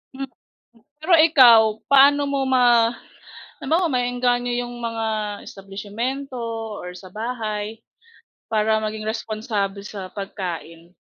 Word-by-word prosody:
Hmm. 270 -1 -5 0.7
Pero 350 +3 +1
ikaw, 260 -8 +8 0.3
paano 280 +1 +6
mo 275 -1 0
ma 240 -3 +4 0.7
halimbawa 345 +3 +1
maeengganyo 245 0 0
yung 240 - -9
mga 230 -1 -2 0.4
establisimyento 220 +8 -5 0.5
or 180 0 -7
sa 185 +1 -12
bahay 220 -2 -4 0.7
para 220 0 +2
maging 215 0 -4
responsable 215 -3 -3
sa 195 -3 -7
pagkain? 175 -4 -7
225 Hz, 105 wpm, -22 LUFS, 205-250 Hz, 0.7 s, ikaw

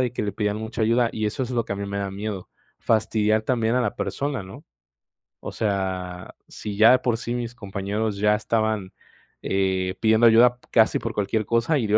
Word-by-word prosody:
de 125 -2 0
que 115 - -3
le 100 - -2
pedían 105 0 -1
mucha 110 +1 -4
ayuda. 115 +2 +3
Y 110 -1 -2
eso 130 +6 -2
es 125 - -8
lo 120 -2 0
que - - -4
a - - -4
mí 100 0 -4
me 100 0 -4
da 100 -1 -3
miedo. 100 -1 -5 0.3
Fastidiar 110 -1 +1
también 115 0 0
a - - +3
la 125 - -1
persona, 140 -5 -3
¿no? 95 0 -12 0.8
O - - -6
sea, 95 -3 -3
si 105 -2 -7
ya 110 +2 +7
de 130 - +5
por 120 -2 0
sí 120 +1 -4
mis 120 -1 -4
compañeros 100 0 -3
ya 105 +1 +3
estaban, 110 -2 -1 0.5
eh, 95 -1 0
pidiendo 110 +1 +5
ayuda 120 +2 +6
casi 110 -1 +4
por 115 0 -4
cualquier 105 +1 -1
cosa, 115 +8 +1
y 125 - 0
dio 105 - +4
110 Hz, 210 wpm, -24 LUFS, 100-115 Hz, 0.8 s, ya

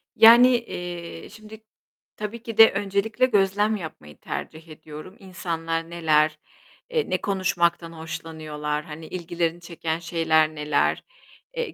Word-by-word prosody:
Yani, 235 +2 +9
eee, 175 -7 -7
şimdi 215 +1 -13 0.5
tabii 215 +2 -6
ki 230 -3 -7
de 225 0 +9
öncelikle 200 +4 0
gözlem 205 -1 +2
yapmayı 155 - -9
tercih 160 +1 -7
ediyorum. 155 +3 -11
İnsanlar 165 -3 -4
neler 155 -2 +2 0.5
eee, 475 -2 -1
ne 185 - 0
konuşmaktan 175 -3 0
hoşlanıyorlar, 155 -2 -5
hani, 155 +1 -9
ilgilerini 170 -1 -3
çeken 165 -1 -4
şeyler 160 -2 +1
neler? 150 -1 0 0.5
Eee, 470 -7 -3
170 Hz, 120 wpm, -24 LUFS, 160-205 Hz, 0.5 s, Yani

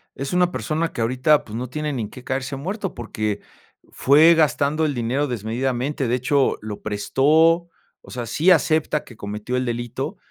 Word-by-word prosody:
es 135 +3 -4
una 180 0 +3
persona 165 -1 -2
que - - -4
ahorita, 130 +6 +2
pues, 105 - -8
no 125 +1 -4
tiene 150 +2 -3
ni 125 - -2
en 105 - -6
qué 125 - -12
caerse 135 +1 -3
muerto, 190 +7 -4
porque 110 -3 -3 0.5
fue 155 +5 +6
gastando 150 0 +2
el 145 -2 -1
dinero 125 +5 0
desmedidamente, 125 +4 -2
de 120 - +1
hecho, 135 +2 +1
lo 105 -1 -7
prestó, 155 +11 +2 0.3
o - - -16
sea, 125 -2 -4
sí 150 +10 +1
acepta 155 -2 +2
que 120 - -13
cometió 105 +4 -5
el 125 0 0
delito, 120 - -4
135 Hz, 180 wpm, -22 LUFS, 120-155 Hz, 0.5 s, fue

